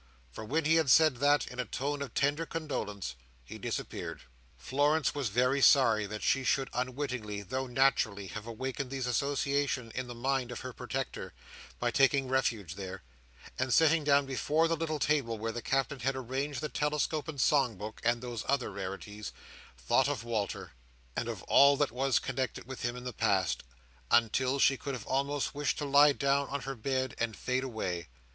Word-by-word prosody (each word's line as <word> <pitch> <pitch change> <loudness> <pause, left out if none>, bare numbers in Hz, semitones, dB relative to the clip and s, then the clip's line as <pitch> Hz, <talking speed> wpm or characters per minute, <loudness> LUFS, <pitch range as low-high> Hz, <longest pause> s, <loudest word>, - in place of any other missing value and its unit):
For 85 - -8
when 150 +8 -1
he 160 +2 +5
had 160 -4 +2
said 155 0 +6
that 145 +3 +3
in 125 - -9
a 125 - 0
tone 140 +5 -3
of 140 -5 -6
tender 145 +4 +1
condolence, 105 - -4 0.3
he - - -9
disappeared. - - -5 0.3
Florence 145 - +1
was 140 -5 -1
very 125 +6 +2
sorry 115 -7 +5
that 105 +1 -6
she 135 - +2
should 135 +1 +1
unwittingly, 125 -5 -3
though 130 +7 -3
naturally, 120 -6 +2
have 105 +3 -7
awakened 130 +3 -4
these 135 -1 -3
associations 140 -1 0
in 130 -1 -3
the 120 - -7
mind 130 0 -1
of 120 - -6
her 130 -1 -6
protector, - - -5 0.4
by 120 0 0
taking 135 0 +3
refuge 115 -9 0
there; 95 -2 -7 0.6
and 130 0 +2
sitting 160 0 +4
down 140 -1 +4
before 150 +4 +1
the 165 - +1
little 155 -1 -2
table 135 -5 +1
where 115 +1 -3
the 120 +1 -5
Captain 135 +1 0
had 135 +3 0
arranged 130 +2 -3
the 150 - -1
telescope 150 +1 -1
and 150 -3 -6
song 135 -4 +3
book, 105 +2 -7
and 120 +1 +1
those 120 -3 -4
other 140 -6 0
rarities, 100 +2 -6 0.5
thought - - +2
of - - -3
Walter, 110 -4 -3 0.4
and - - -2
of - - -5
all 140 0 +6
that 145 -3 +1
was 130 +2 +1
connected 130 -4 -3
with 130 -1 -7
him 120 0 -2
in 125 - -8
the 125 -1 -5
past, 95 -5 +1 0.5
until 125 +3 +3
she 135 0 +4
could 140 0 -4
have 120 - -8
almost 140 +1 -1
wished 145 0 -1
to 150 - -2
lie 145 +1 +6
down 140 0 +1
on 140 0 -3
her 135 +1 -4
bed 130 +1 -2
and 115 -2 -1
fade 130 +1 -1
away. 95 -9 -3
130 Hz, 185 wpm, -31 LUFS, 115-140 Hz, 0.6 s, said